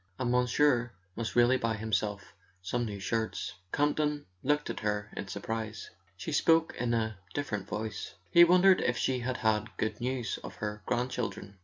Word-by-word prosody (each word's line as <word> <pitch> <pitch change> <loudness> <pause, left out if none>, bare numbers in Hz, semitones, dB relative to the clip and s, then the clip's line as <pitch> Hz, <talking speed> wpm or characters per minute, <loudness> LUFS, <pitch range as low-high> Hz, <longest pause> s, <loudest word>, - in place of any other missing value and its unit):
And 125 -2 0
monsieur 125 -1 +3 0.2
must 115 -1 -3
really 120 +2 +5
buy 115 -2 0
himself 105 -2 -2 0.3
some 120 +6 -1
new 100 -3 -5
shirts." 110 +2 -2 0.2
Camp 145 0 +2
ton 150 -1 0 0.2
looked 150 +2 +1
at - - -6
her 105 0 -2
in 100 - -5
surprise. 110 +2 -4 0.3
She 160 - -5
spoke 165 +2 +3
in 120 -1 0
a 110 -3 -1 0.2
different 105 -9 -2
voice; 110 -1 -4 0.2
he 170 - +9
wondered 180 +2 +6
if 120 0 +1
she 130 -1 +1
had 125 +1 -2
had 110 -1 0
good 110 +1 -2
news 125 -1 -2
of - - -8
her 105 -1 -4
grandchildren. 120 -5 -2
120 Hz, 170 wpm, -30 LUFS, 105-130 Hz, 0.3 s, he